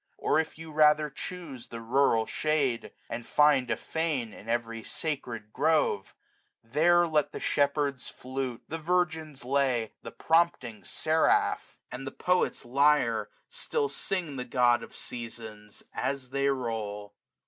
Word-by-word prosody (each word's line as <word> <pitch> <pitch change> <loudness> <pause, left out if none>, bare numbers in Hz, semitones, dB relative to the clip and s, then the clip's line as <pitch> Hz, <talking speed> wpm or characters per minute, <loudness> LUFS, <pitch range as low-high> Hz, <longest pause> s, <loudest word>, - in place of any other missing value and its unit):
Or - - +2
if 160 -1 -2
you 160 0 -9
rather 150 -1 +4
chuse 150 -5 -7
the 115 - -7
rural 115 -1 +3
shade. 145 -6 0 0.2
And 120 +1 -5
find 140 -2 +4
a - - +1
fane 150 -9 -2
in 110 - -11
every 115 -1 -2
sacred 120 -9 -4
grove; 150 -9 +1 0.5
90 115 +1 -28
There 175 +3 +5
let 155 -2 +1
the - - -6
shepherd's 140 -2 0
flute, 130 -2 -5
the 165 - -4
virgin's 160 -5 -1
lay. 130 -4 +1
The - - -7
prompting 160 -10 +1
seraph, 160 +1 +1
and 135 +1 -6
the - - -4
poet's 180 -7 0
lyre, 125 -4 +3 0.2
Still 140 - -1
sing 155 0 -2
the 125 - -2
God 120 -1 +3
of - - -11
Seasons, 110 -3 -7
as 135 -2 -2
they 140 0 +1
roll. 110 -6 -3
135 Hz, 140 wpm, -29 LUFS, 115-155 Hz, 0.5 s, There